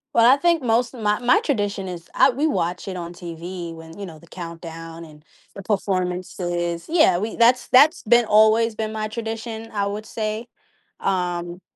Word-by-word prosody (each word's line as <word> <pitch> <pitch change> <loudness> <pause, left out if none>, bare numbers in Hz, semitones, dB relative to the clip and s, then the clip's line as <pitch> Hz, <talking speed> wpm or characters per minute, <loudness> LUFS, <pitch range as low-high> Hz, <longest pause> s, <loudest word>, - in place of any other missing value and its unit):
Well, 230 - +6
I 275 - +5
think 335 -1 +2
most 235 +1 +1
of 245 - -9
my 210 0 +1
my 245 +1 +4
tradition 205 -7 -1
is, 175 -2 -8
I - - +6
we 280 +5 0
watch 175 - -2
it 190 - -4
on 170 0 -6
TV 170 0 -7
when, 160 +1 -12
you 200 - -5
know, 160 -3 -11
the 170 - -18
countdown 165 -1 -8
and 150 -1 -15 0.3
the 200 - -7
performances, 180 -3 -2
yeah, 310 - +4
we 215 +4 -3
that's 240 +1 +4
that's 295 +7 +5
been, 240 +2 +4
always 220 +1 +4
been 220 0 -3
my 215 0 -2
tradition, 225 0 -5
I 200 -1 0
would 210 +2 -4
say, 220 +1 -4 0.5
um 175 -2 -2
200 Hz, 185 wpm, -22 LUFS, 175-230 Hz, 0.5 s, Well